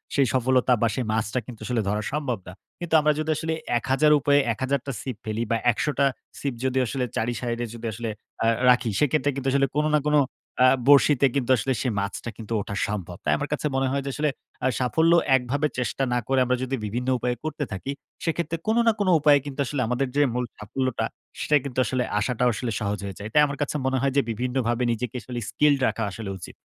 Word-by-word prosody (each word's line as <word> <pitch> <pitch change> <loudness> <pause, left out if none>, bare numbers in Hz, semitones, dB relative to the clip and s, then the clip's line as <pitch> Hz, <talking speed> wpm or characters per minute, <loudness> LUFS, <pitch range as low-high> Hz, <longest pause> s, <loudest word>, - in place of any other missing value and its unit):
সেই 135 -3 +4
সফলতা 130 0 +3
বা 115 - +4
সেই 125 - -1
মাছটা 110 +2 0
কিন্তু 120 -3 -9
আসলে 120 -2 0
ধরা 105 +1 0
সম্ভব 140 -7 -1
না। 90 - -8 0.3
কিন্তু 175 -2 -5
আমরা 150 0 +3
যদি 155 - -2
আসলে 160 0 -2 0.2
১০০০ 135 +5 +2
উপায়ে 145 +1 +4
১০০০ 130 +5 -1
টা 135 - -3
সিপ 130 -5 -5
ফেলি 110 +1 -2
বা 115 - +3
১০০ 110 - -2
টা 140 - +5 0.3
সিপ 140 -3 -2
যদি 130 0 0
আসলে 130 +2 -2
৪ 110 - 0
ই - - -7
side 120 -1 -2
এ - - -11
যদি 115 0 -8
আসলে 115 +1 -4 0.3
আ - - +2 0.2
রাখি 125 -1 +4
সেক্ষেত্রে 145 -1 +2
কিন্তু 135 -1 -3
আসলে 140 0 +3
কোন 150 +1 +2
না - - +4
কোন 150 - +3 0.5
আ - - +8 0.2
বরশিতে 140 -1 +6
কিন্তু 130 -2 -1
আসলে 130 +4 0
সেই 125 - 0
মাছটা 100 +4 -4
কিন্তু 115 0 -10
ওঠা 100 - -5
সম্ভব। 95 -4 -4
তাই - - +2
আমার 145 0 -4
কাছে 150 - -3
মনে 135 0 +1
হয় 140 0 0
যে - - -2
আসলে 150 0 0 0.3
অ্যা 130 - 0
আসলে - - -1
সাফল্য 160 +6 +2 0.2
একভাবে 135 +4 0
চেষ্টা 125 +2 -1
না 125 - +2
করে 135 0 +2
আমরা 125 +1 +2
যদি 130 +1 -1
বিভিন্ন 120 +5 -3
উপায়ে 125 +1 -1
করতে 155 -1 -3
থাকি, 95 +8 -4 0.3
সেক্ষেত্রে 165 0 -1
কোন 220 +2 +2
না - - +7
কোন 205 - +1
উপায়ে 145 -1 +5
কিন্তু 140 0 -7
আসলে 135 0 -2
আমাদের 125 +3 0
যে 145 - +4
মূল 125 0 -1
সাফল্যটা 125 +4 -2 0.3
সেটা 150 - +2
কিন্তু 130 -2 -3
আসলে 125 +2 0 0.2
আসাটাও 125 +2 +1
আসলে 115 +2 -3
সহজ 105 -2 -2
হয়ে 95 - -6
যায়। 105 - -6
তাই 150 - +6
আমার 140 0 -5
কাছে 145 - -1
মনে 130 0 +1
হয় 135 -1 +1
যে - - +6
"বিভিন্নভাবে 125 +1 -1
নিজেকে 120 +1 -3
আসলে 120 0 -5
স্কিলড 150 -1 +3
রাখা 115 - -1
আসলে 105 0 -6
উচিত।" 85 - -10
130 Hz, 225 wpm, -25 LUFS, 115-140 Hz, 0.5 s, আ